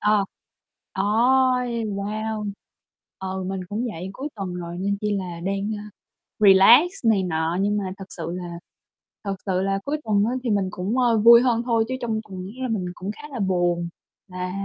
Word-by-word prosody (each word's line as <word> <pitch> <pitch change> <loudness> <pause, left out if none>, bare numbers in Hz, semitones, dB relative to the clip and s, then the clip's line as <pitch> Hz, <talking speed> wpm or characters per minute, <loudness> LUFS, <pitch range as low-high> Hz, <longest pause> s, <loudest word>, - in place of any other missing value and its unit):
Ờ, 210 -1 +3 0.7
Ôi! 245 +3 +2
Wow! 210 +1 -3 0.7
Ừ, 190 0 -4
mình 190 0 -3
cũng 220 +5 -2
vậy. 180 +1 -6
Cuối 280 +8 -5
tuần 190 -3 -4
rồi, 175 0 -6
nên 200 +1 0
chỉ 210 -1 0
là 175 -3 -6
đang, 195 +4 -2
a, 210 0 -9 0.5
relax 210 - +7
này 210 -4 +4
nọ, 165 -1 -1
nhưng 205 +1 +1
mà 200 - -2
thật 195 - -8
sự 165 -1 -5
là 175 -1 -6 0.6
thật 200 -1 -2
sự 185 -1 +1
là 195 0 0
cuối 295 +2 -1
tuần 205 -2 +2
á 230 - 0
thì 240 - -1
mình 200 -3 +1
cũng, 195 +8 -2
ơ, 235 -3 +3
vui 235 +2 +8
hơn 240 -2 +2
thôi, 230 -2 +2
chứ 260 - -1
trong 225 -2 -1
tuần 185 -1 -6
á - - -8
là 255 - 0
mình 200 -5 -1
cũng 190 +3 -5
khá 295 +7 -10
là 255 - -5
buồn, 175 -3 +1 0.4
là 180 -1 -5
200 Hz, 195 wpm, -24 LUFS, 185-225 Hz, 0.7 s, vui